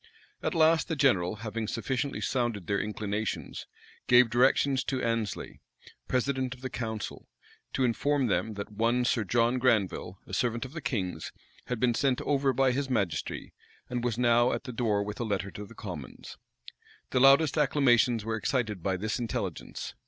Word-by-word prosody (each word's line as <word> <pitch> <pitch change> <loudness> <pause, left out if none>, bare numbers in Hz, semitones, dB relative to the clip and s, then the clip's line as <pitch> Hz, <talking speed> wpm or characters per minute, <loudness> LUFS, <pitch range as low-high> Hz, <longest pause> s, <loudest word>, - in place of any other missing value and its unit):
At - - -2
last, 160 0 +4
the 160 - -1
general, 110 -10 +2
having 110 0 -3
sufficiently 130 +5 -2
sounded 120 -7 -1
their 100 +2 0
inclinations, 105 0 -4 0.4
gave 120 -1 +6
directions 130 +2 +3
to 130 - -1
Annesley, 115 -2 -2 0.5
president 130 0 0
of 125 - -19
the 130 -1 -5
council, 110 -3 -5 0.5
to 130 - +1
inform 135 +3 +1
them, 110 0 0
that 100 +1 -6
one 115 +4 +1
Sir 120 -2 +1
John 120 +5 +2
Granville, 105 -6 +1
a - - -12
servant 120 0 0
of 130 - -10
the 155 - -5
king's, 110 -10 -3 0.4
had 125 -2 -2
been 120 0 +3
sent 130 +1 +1
over 140 -1 +1
by 130 +1 +3
his 135 +1 -2
majesty, 100 - -2 0.4
and 120 -1 -2
was 120 -2 -1
now 120 0 +4
at - - -3
the 125 -3 -7
door 110 -4 +1
with 105 +1 -6
a - - -1
letter 100 -3 -2
to 105 0 -8
the - - -14
commons. - - -8 0.8
The 130 - +2
loudest 140 +3 +6
acclamations 125 -6 +3
were 110 0 -1
excited 110 - -1
by 95 +1 0
this 110 +6 -2
intelligence. 120 -2 -4
120 Hz, 170 wpm, -29 LUFS, 110-130 Hz, 0.8 s, gave